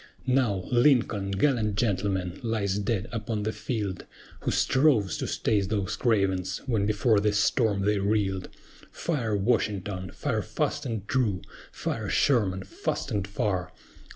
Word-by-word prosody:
Now, 125 -8 +2
LINCOLN, 120 -6 +3
gallant 110 -5 +2
gentleman, 95 -4 -1
lies 105 -4 -1
dead 105 0 -1
upon 110 -2 -3
the 110 - 0
field, 105 -6 -3 0.3
Who - - -2
strove 130 - +3
to - - -2
stay 105 -2 +1
those 100 0 -1
cravens, 95 -5 +1
when 110 -6 +1
before 110 0 +3
the 105 +1 +2
storm 105 -1 +2
they 105 0 +2
reeled. 100 -2 0 0.4
Fire, 120 -10 -1
WASHINGTON, 100 -3 0
fire - - -1
fast - - -2
and 110 -4 -4
true! 110 -9 0 0.3
Fire, - - -3
SHERMAN, 100 -9 +2
fast - - -3
and 100 -2 -1
far! 100 -3 -1
105 Hz, 135 wpm, -27 LUFS, 95-115 Hz, 0.4 s, LINCOLN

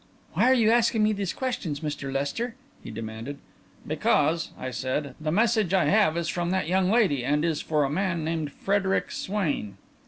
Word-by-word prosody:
"Why - - +3
are - - +6
you 225 -3 +4
asking 230 -1 +3
me 215 0 +3
these 200 -3 -2
questions, 185 - -3
Mr. 145 -3 -4
Lester?" 145 - -2 0.3
he - - -8
demanded. 115 +5 -6 0.5
"Because," 165 +1 +1
I 130 - -5
said, 130 +3 -2
"the 155 0 -1
message 215 -1 +2
I 180 -4 +3
have 200 -6 +3
is 170 -1 -1
from 175 +2 -1
that 185 -3 0
young 185 +1 +2
lady, 195 - +3
and 150 +4 +1
is 160 -3 0
for 150 -2 +1
a 135 - 0
man 170 -1 -1
named 160 -2 -2
Frederic 195 +2 0
Swain." 150 - -2
170 Hz, 185 wpm, -26 LUFS, 145-205 Hz, 0.5 s, are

